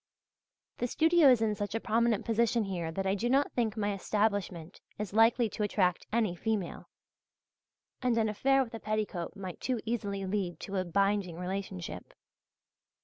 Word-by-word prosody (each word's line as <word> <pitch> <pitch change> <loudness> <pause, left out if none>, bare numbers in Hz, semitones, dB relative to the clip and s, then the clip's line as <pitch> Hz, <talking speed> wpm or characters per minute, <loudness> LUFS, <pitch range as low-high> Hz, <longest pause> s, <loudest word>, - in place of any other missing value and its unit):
The 245 - 0
studio 320 +2 +5
is 245 -3 +5
in 215 -1 +1
such 205 +1 -4
a - - +1
prominent 230 -1 +1
position 230 0 +2
here 175 -5 -3
that 195 +4 -3
I 190 - +2
do 225 +5 -1
not 275 +3 +3
think 225 -3 -1
my 205 -1 0
establishment 195 -4 -1 0.2
is 210 -1 -5
likely 225 +2 +4
to 210 - -6
attract 185 -4 +1
any 215 -5 +1
female; 205 -1 -3 1.1
and 250 -2 +1
an 220 -1 +3
affair 270 +6 +2
with 235 - -11
a 225 - -5
petticoat 210 -6 -3
might 185 -3 -7
too 255 -3 -1
easily 200 -4 -2
lead 185 -4 -2
to 195 0 -4
a 185 - 0
binding 195 -1 +1
relationship. 180 - -5
210 Hz, 165 wpm, -31 LUFS, 195-230 Hz, 1.1 s, studio